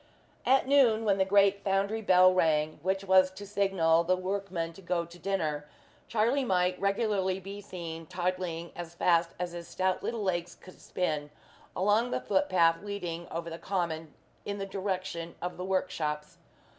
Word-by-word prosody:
At 265 Hz, 0 st, +4 dB
noon, 245 Hz, -6 st, +4 dB
when 200 Hz, -2 st, +2 dB
the 190 Hz, -, +4 dB
great 200 Hz, 0 st, +4 dB
foundry 200 Hz, +3 st, 0 dB
bell 185 Hz, -2 st, +6 dB
rang, 155 Hz, -3 st, +1 dB
which 190 Hz, +2 st, -1 dB
was 185 Hz, -1 st, +5 dB
the 190 Hz, +2 st, -10 dB
signal 190 Hz, -5 st, +2 dB
for -, -, -14 dB
the 185 Hz, -, +4 dB
workmen 185 Hz, -3 st, -3 dB
to 195 Hz, -, -13 dB
go 175 Hz, -1 st, -1 dB
to 170 Hz, +1 st, -14 dB
dinner 155 Hz, -7 st, -2 dB, 0.4 s
Charlie 235 Hz, +5 st, +2 dB
might 180 Hz, -5 st, +1 dB
regularly 200 Hz, -2 st, +1 dB
be 200 Hz, +2 st, -8 dB
seen, 165 Hz, -5 st, -7 dB
toddling 180 Hz, -1 st, -3 dB
as 170 Hz, -1 st, -7 dB
fast 170 Hz, -1 st, +2 dB
as 180 Hz, 0 st, -3 dB
his 170 Hz, 0 st, -7 dB
stout 185 Hz, +1 st, 0 dB
little 230 Hz, -3 st, -3 dB
legs 175 Hz, -2 st, -1 dB
could 185 Hz, -, -16 dB
spin, 150 Hz, -5 st, -2 dB, 0.5 s
along 210 Hz, +5 st, +2 dB
the -, -, -1 dB
footpath 185 Hz, -4 st, +2 dB
leading 180 Hz, -5 st, -5 dB
over 165 Hz, 0 st, -5 dB
the 165 Hz, -, -6 dB
common 165 Hz, -5 st, -3 dB, 0.3 s
in 200 Hz, 0 st, -4 dB
the 195 Hz, -, -3 dB
direction 185 Hz, -3 st, -4 dB
of 180 Hz, +1 st, -4 dB
the 180 Hz, -, -5 dB
workshops. 155 Hz, -5 st, -2 dB
185 Hz, 170 wpm, -30 LUFS, 170-200 Hz, 0.5 s, bell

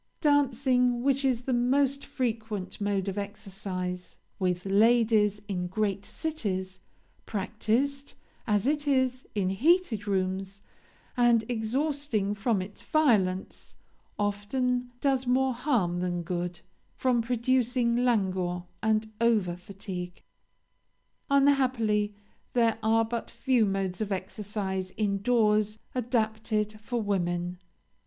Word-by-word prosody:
"Dancing, 255 Hz, -4 st, +3 dB
which 275 Hz, 0 st, +2 dB
is 255 Hz, -3 st, +2 dB
the 255 Hz, +1 st, -2 dB
most 270 Hz, +3 st, +2 dB
frequent 220 Hz, -6 st, -3 dB
mode 200 Hz, -1 st, 0 dB
of 195 Hz, +1 st, -2 dB
exercise 195 Hz, -3 st, -5 dB, 0.2 s
with 180 Hz, -1 st, 0 dB
ladies 210 Hz, 0 st, +3 dB
in 180 Hz, -3 st, -2 dB
great 200 Hz, +1 st, -1 dB
cities, 190 Hz, -, -3 dB, 0.5 s
practiced, 225 Hz, +7 st, -1 dB, 0.3 s
as 210 Hz, 0 st, +2 dB
it 290 Hz, +1 st, 0 dB
is, 260 Hz, -2 st, +1 dB
in 195 Hz, -3 st, +1 dB
heated 255 Hz, -, +2 dB
rooms, 190 Hz, 0 st, -2 dB, 0.5 s
and 240 Hz, -2 st, +4 dB
exhausting 245 Hz, -2 st, -1 dB
from 210 Hz, -1 st, 0 dB
its 200 Hz, +2 st, -11 dB
violence, 205 Hz, -12 st, +1 dB, 0.4 s
often 245 Hz, +5 st, -1 dB
does 265 Hz, -2 st, +1 dB
more 260 Hz, +1 st, +3 dB
harm 235 Hz, -, 0 dB
than 175 Hz, -1 st, -2 dB
good, 175 Hz, 0 st, -3 dB, 0.3 s
from 250 Hz, -2 st, +2 dB
producing 245 Hz, 0 st, +1 dB
languor 190 Hz, -7 st, +1 dB, 0.2 s
and 220 Hz, 0 st, +1 dB
over 215 Hz, -7 st, +2 dB
fatigue. 180 Hz, -1 st, -7 dB, 1.1 s
Unhappily 255 Hz, -7 st, +3 dB, 0.4 s
there 230 Hz, -2 st, +2 dB
are 225 Hz, +1 st, +3 dB
but 230 Hz, +1 st, -4 dB
few 245 Hz, -5 st, +2 dB
modes 195 Hz, -1 st, -2 dB
of 210 Hz, -1 st, -2 dB
exercise 190 Hz, 0 st, -3 dB
in 200 Hz, -2 st, 0 dB
doors 215 Hz, -2 st, +2 dB, 0.2 s
adapted 220 Hz, -3 st, -1 dB
for 235 Hz, +3 st, -3 dB
women. 175 Hz, -4 st, -1 dB
215 Hz, 110 wpm, -28 LUFS, 195-250 Hz, 1.1 s, and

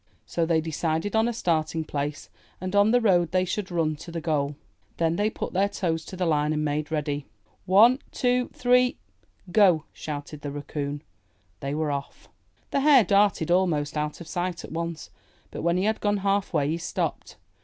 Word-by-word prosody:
So 165 Hz, -1 st, -1 dB
they 160 Hz, -1 st, +2 dB
decided 160 Hz, +4 st, -2 dB
on 220 Hz, +1 st, +3 dB
a -, -, 0 dB
starting 165 Hz, -6 st, 0 dB
place 145 Hz, -1 st, -4 dB, 0.3 s
and 185 Hz, +2 st, -4 dB
on 205 Hz, +1 st, +5 dB
the 245 Hz, +2 st, +4 dB
road 180 Hz, -7 st, +3 dB
they 185 Hz, 0 st, +1 dB
should 190 Hz, +2 st, -3 dB
run 165 Hz, -3 st, 0 dB
to 170 Hz, -, -10 dB
the 165 Hz, -, -3 dB
goal. 150 Hz, -3 st, -1 dB, 0.4 s
Then 165 Hz, 0 st, +1 dB
they 205 Hz, +3 st, +1 dB
put -, -, -5 dB
their 195 Hz, +2 st, +2 dB
toes 165 Hz, -5 st, -2 dB
to -, -, -8 dB
the 180 Hz, -, 0 dB
line 150 Hz, -2 st, +1 dB
and 150 Hz, 0 st, -1 dB
made 150 Hz, 0 st, -1 dB
ready. 145 Hz, -2 st, -2 dB, 0.4 s
''One, 225 Hz, +8 st, +6 dB
two, 250 Hz, 0 st, +1 dB
three, 250 Hz, 0 st, +3 dB, 0.5 s
go!'' 180 Hz, -6 st, +5 dB
shouted 145 Hz, 0 st, -6 dB
the 145 Hz, -, -4 dB
Raccoon. 145 Hz, 0 st, -5 dB, 0.6 s
They 140 Hz, +1 st, -3 dB
were 155 Hz, -1 st, -1 dB
off! 140 Hz, 0 st, -6 dB, 0.4 s
The -, -, +2 dB
Hare 275 Hz, -3 st, +6 dB
darted 200 Hz, -5 st, +2 dB
almost 165 Hz, -6 st, +1 dB
out 150 Hz, 0 st, -2 dB
of 170 Hz, -, -9 dB
sight 175 Hz, +1 st, -3 dB
at -, -, -12 dB
once, 170 Hz, 0 st, -4 dB, 0.4 s
but -, -, -6 dB
when 170 Hz, +1 st, +1 dB
he 185 Hz, -, +1 dB
had 220 Hz, +1 st, 0 dB
gone 205 Hz, 0 st, +1 dB
half 200 Hz, 0 st, +1 dB
way, 145 Hz, -4 st, +1 dB
he 165 Hz, +2 st, -1 dB
stopped. 165 Hz, -, -3 dB
170 Hz, 190 wpm, -26 LUFS, 150-200 Hz, 0.6 s, One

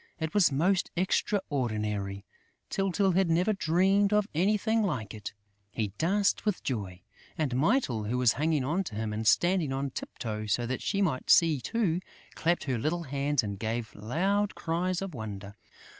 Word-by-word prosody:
It 160 Hz, -1 st, -3 dB
was 200 Hz, -7 st, +4 dB
most 175 Hz, +7 st, +1 dB
extraordinary! 110 Hz, -, -1 dB, 0.5 s
Tyltyl 195 Hz, 0 st, +1 dB
had 185 Hz, 0 st, +2 dB
never 180 Hz, +6 st, +2 dB
dreamed 195 Hz, +3 st, +2 dB
of 210 Hz, -1 st, +2 dB
anything 210 Hz, +6 st, +2 dB
like 130 Hz, -, -2 dB
it! 105 Hz, -1 st, -7 dB, 0.4 s
He 105 Hz, -1 st, -2 dB
danced 200 Hz, +4 st, +2 dB
with 210 Hz, -4 st, -1 dB
joy; 95 Hz, -8 st, -4 dB, 0.3 s
and 145 Hz, -6 st, -1 dB
Mytyl, 135 Hz, -, +1 dB
who 120 Hz, +4 st, -1 dB
was 125 Hz, -2 st, +4 dB
hanging 155 Hz, -1 st, +1 dB
on 165 Hz, +9 st, 0 dB
to 110 Hz, -, -7 dB
him 110 Hz, 0 st, -2 dB
and 110 Hz, +1 st, -2 dB
standing 175 Hz, -, +3 dB
on 135 Hz, +1 st, -2 dB
tip -, -, -7 dB
toe 110 Hz, -3 st, -4 dB
so 120 Hz, +3 st, +1 dB
that 130 Hz, +2 st, -3 dB
she 200 Hz, -1 st, 0 dB
might 140 Hz, -9 st, -1 dB
see 160 Hz, -6 st, +5 dB
too, 185 Hz, -, 0 dB, 0.3 s
clapped 170 Hz, +2 st, 0 dB
her 130 Hz, -4 st, -1 dB
little 170 Hz, +8 st, -1 dB
hands 140 Hz, -1 st, 0 dB
and 100 Hz, -2 st, -5 dB
gave 115 Hz, +1 st, -3 dB
loud 190 Hz, -, 0 dB
cries 180 Hz, +3 st, -1 dB
of 195 Hz, -3 st, -6 dB
wonder. 105 Hz, -4 st, -7 dB
155 Hz, 170 wpm, -29 LUFS, 115-190 Hz, 0.5 s, see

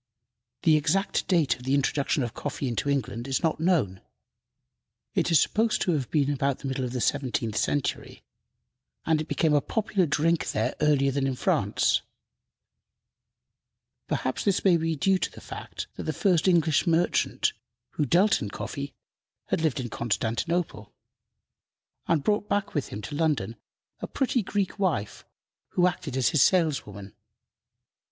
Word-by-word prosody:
The 160 Hz, -3 st, +5 dB
exact 165 Hz, +7 st, 0 dB
date 165 Hz, -7 st, +2 dB
of -, -, -16 dB
the 135 Hz, +2 st, +1 dB
introduction 140 Hz, +1 st, +1 dB
of 120 Hz, -, -4 dB
coffee 140 Hz, -, -4 dB
into 125 Hz, +4 st, -1 dB
England 120 Hz, -3 st, -2 dB
is 135 Hz, +5 st, -1 dB
not 160 Hz, -2 st, +1 dB
known. 155 Hz, -, +1 dB, 1.1 s
It -, -, +1 dB
is 165 Hz, -4 st, +5 dB
supposed 220 Hz, +7 st, +1 dB
to 180 Hz, -, +1 dB
have 140 Hz, -7 st, -1 dB
been 145 Hz, -2 st, +1 dB
about 140 Hz, -1 st, 0 dB
the 140 Hz, -, -6 dB
middle 130 Hz, 0 st, -2 dB
of 125 Hz, -, -3 dB
the 125 Hz, -, -3 dB
seventeenth 120 Hz, -5 st, -1 dB
century, 145 Hz, +4 st, -2 dB, 0.8 s
and 160 Hz, -1 st, +2 dB
it 155 Hz, -, -6 dB
became 155 Hz, -1 st, +1 dB
a 145 Hz, -, +4 dB
popular 200 Hz, -3 st, 0 dB
drink 165 Hz, +3 st, +1 dB
there -, -, 0 dB
earlier 140 Hz, -2 st, +3 dB
than 135 Hz, 0 st, 0 dB
in 135 Hz, -, -1 dB
France. -, -, +1 dB, 2.1 s
Perhaps 130 Hz, -, -2 dB
this 200 Hz, -1 st, +1 dB
may 185 Hz, -3 st, +6 dB
be 165 Hz, -1 st, 0 dB
due 190 Hz, +6 st, +2 dB
to -, -, -1 dB
the -, -, -12 dB
fact -, -, -7 dB
that -, -, -4 dB
the -, -, -1 dB
first 185 Hz, -4 st, +2 dB
English 165 Hz, -4 st, +3 dB
merchant 170 Hz, +1 st, +1 dB, 0.4 s
who -, -, -1 dB
dealt 185 Hz, -, +3 dB
in 105 Hz, -, -3 dB
coffee 140 Hz, +6 st, -6 dB, 0.5 s
had -, -, 0 dB
lived 155 Hz, -4 st, 0 dB
in 125 Hz, -2 st, -4 dB
Constantinople, 115 Hz, -, -2 dB, 1.1 s
and 160 Hz, -4 st, +2 dB
brought 210 Hz, 0 st, 0 dB
back 205 Hz, 0 st, -1 dB
with 145 Hz, -5 st, -1 dB
him 105 Hz, -, -7 dB
to -, -, -6 dB
London 145 Hz, -9 st, 0 dB, 0.4 s
a -, -, -5 dB
pretty 260 Hz, -2 st, 0 dB
Greek 200 Hz, 0 st, -2 dB
wife, 150 Hz, -, -1 dB, 0.5 s
who 180 Hz, -, +3 dB
acted 150 Hz, -6 st, -2 dB
as 130 Hz, -, +3 dB
his 155 Hz, -, +2 dB
saleswoman. 135 Hz, -, +1 dB
150 Hz, 160 wpm, -27 LUFS, 130-175 Hz, 2.1 s, may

